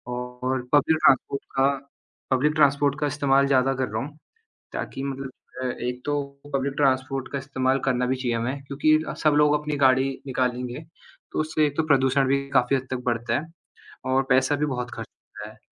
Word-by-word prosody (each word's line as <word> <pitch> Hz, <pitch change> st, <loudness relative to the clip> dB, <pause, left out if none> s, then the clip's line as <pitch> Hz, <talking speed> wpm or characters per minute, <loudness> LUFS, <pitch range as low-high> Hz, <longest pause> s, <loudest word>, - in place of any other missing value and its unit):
और 125 Hz, +1 st, -3 dB
public 155 Hz, +2 st, +4 dB
transport 135 Hz, +1 st, +2 dB
का 135 Hz, +1 st, +5 dB, 0.6 s
public 145 Hz, +4 st, +2 dB
transport 145 Hz, -1 st, +3 dB
का 150 Hz, -, +1 dB
इस्तेमाल 140 Hz, -1 st, +2 dB
ज़्यादा 135 Hz, 0 st, +3 dB
कर 130 Hz, -1 st, -1 dB
रहा 110 Hz, +1 st, -2 dB
हूँ। 150 Hz, +1 st, -12 dB, 0.6 s
ताकि 135 Hz, -, -5 dB
मतलब 135 Hz, -1 st, -4 dB, 0.3 s
अ, -, -, -2 dB
एक 125 Hz, 0 st, -4 dB
तो 145 Hz, 0 st, 0 dB, 0.3 s
पब्लिक 135 Hz, 0 st, -1 dB
ट्रांसपोर्ट 135 Hz, -1 st, +1 dB
का 140 Hz, -, -2 dB
इस्तेमाल 130 Hz, 0 st, 0 dB
करना 125 Hz, -2 st, +1 dB
भी 130 Hz, -, +1 dB
चाहिए 125 Hz, -2 st, -1 dB
हमें 130 Hz, +4 st, -3 dB
क्योंकि 155 Hz, +2 st, +3 dB
अ, -, -, -3 dB
सब 155 Hz, -1 st, +2 dB
लोग 150 Hz, 0 st, +5 dB
अपनी 150 Hz, -1 st, -3 dB
गाड़ी 130 Hz, -1 st, +4 dB, 0.2 s
निकालेंगे, 125 Hz, 0 st, -2 dB, 0.5 s
तो -, -, -2 dB
उससे 155 Hz, 0 st, +1 dB
एक 145 Hz, -, -6 dB
तो 160 Hz, -, +2 dB
प्रदूषण 135 Hz, -1 st, +3 dB
भी 140 Hz, +1 st, +3 dB, 0.2 s
काफ़ी 125 Hz, +2 st, +3 dB
हद 130 Hz, -1 st, -3 dB
तक 125 Hz, -1 st, -3 dB
बढ़ता 120 Hz, -1 st, 0 dB
है 160 Hz, -, -10 dB, 0.6 s
और 135 Hz, +1 st, +3 dB
पैसा 130 Hz, +3 st, +3 dB
भी 150 Hz, +1 st, 0 dB
बहुत 125 Hz, -3 st, -3 dB
खर्च -, -, -7 dB
होता -, -, -12 dB
है। -, -, -16 dB
135 Hz, 190 wpm, -25 LUFS, 130-145 Hz, 0.6 s, का